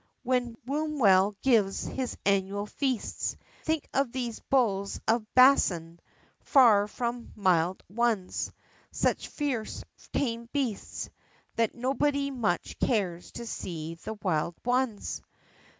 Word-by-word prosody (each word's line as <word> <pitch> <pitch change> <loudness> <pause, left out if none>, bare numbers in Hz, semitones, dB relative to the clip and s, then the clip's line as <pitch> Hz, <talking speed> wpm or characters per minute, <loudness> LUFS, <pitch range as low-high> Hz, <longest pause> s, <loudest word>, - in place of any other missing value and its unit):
when 245 -2 0
Wombwell 250 -10 +3
gives 215 -7 +3
his 260 -2 -3
annual 200 +1 +1
feasts, 255 +1 -2 0.2
Think 315 -2 -1
of 275 -3 +1
these 240 -3 -3
"Bulls 200 -7 +1
of 220 -1 +1
Basan," 175 -11 +5 0.4
far 220 -7 +5
from 235 +2 -4
mild 185 -3 +2
ones; 220 -3 0 0.4
Such - - 0
fierce 265 -7 -3 0.3
tame 235 -3 -1
beasts, 260 -8 -3 0.4
That 230 -1 +1
nobody 280 +3 0
much 230 -9 -1
cares 185 -8 0
to 235 - -6
see 165 -7 -5
the 195 +6 -7
Wild 175 -5 -1
ones! 245 -3 0
230 Hz, 110 wpm, -29 LUFS, 195-255 Hz, 0.4 s, Basan